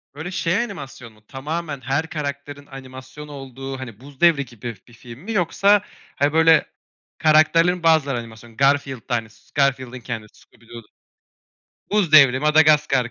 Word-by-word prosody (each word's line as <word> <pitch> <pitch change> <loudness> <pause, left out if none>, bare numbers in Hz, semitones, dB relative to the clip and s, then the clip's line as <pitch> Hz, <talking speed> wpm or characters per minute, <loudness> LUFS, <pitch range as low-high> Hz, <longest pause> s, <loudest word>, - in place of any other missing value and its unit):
Böyle 160 +5 -7
şey 175 0 -1
animasyon 135 - -9
mu? 105 - -24
Tamamen 145 +1 -5
her 140 +5 -2
karakterin 145 -1 -6
animasyon 135 +2 -11
olduğu 135 -1 -8
hani 115 -4 -9
'Buz 140 +2 -16
Devri' 160 -5 +4
gibi 120 0 -8
bir 120 - -19
film 120 +1 -13
mi 210 +8 -8
yoksa, 200 +1 +2 0.3
hani, 145 +2 0
böyle 160 0 +5 0.5
karakterlerin 165 +3 +3
bazıları 150 -6 +2
animasyon; 115 0 -13
Garfield'da 135 -3 0
hani 115 -1 -4
s - - -25
Garfield'ın 130 -3 0
kendisi, 115 -3 -8
Scooby 115 -1 -24
Doo, 120 -1 -10 1.1
Buz 200 -7 +1
devri, 135 -4 +7
Madagaskar 150 -5 +3
140 Hz, 145 wpm, -21 LUFS, 125-155 Hz, 1.1 s, devri